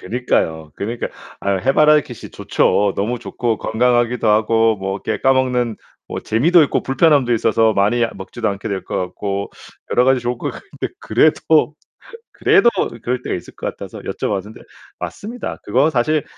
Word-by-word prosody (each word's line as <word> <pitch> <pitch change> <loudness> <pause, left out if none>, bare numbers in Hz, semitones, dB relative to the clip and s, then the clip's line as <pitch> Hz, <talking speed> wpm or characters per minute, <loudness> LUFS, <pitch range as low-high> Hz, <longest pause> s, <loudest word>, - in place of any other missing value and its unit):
그니까요. 80 -8 -1
그니까 115 +4 -3 0.3
아, 100 - -1
해바라기씨 135 +1 +2
좋죠. 100 -1 +1
너무 115 +5 -1
좋고 115 -1 -2
건강하기도 120 0 +1
하고 110 +1 +3
뭐 95 0 -3
이렇게 - - -2
까먹는 125 -4 +1 0.3
뭐 - - -4
재미도 160 +10 +4
있고 - - -1
불편함도 135 -2 +3
있어서 115 0 +2
많이 105 +5 +2
먹지도 95 - -4
않게 100 +2 -4
될 100 -2 -3
것 - - -4
같고. 100 +2 -3 0.4
여러 125 - +4
가지 130 -1 +3
좋을 120 0 -3
것 - - -3
같은데 - - -7
그래도 150 +5 +2 0.6
그래도 240 - +4 0.3
그럴 125 +1 -1
때가 - - -2
있을 90 - -9
것 - - -5
같아서 - - -7
여쭤봤는데. 105 +2 -4 0.4
맞습니다. 235 +4 -6
그거 130 +9 +2
사실 150 +2 +1
120 Hz, 350 characters per minute, -19 LUFS, 105-130 Hz, 0.6 s, 재미도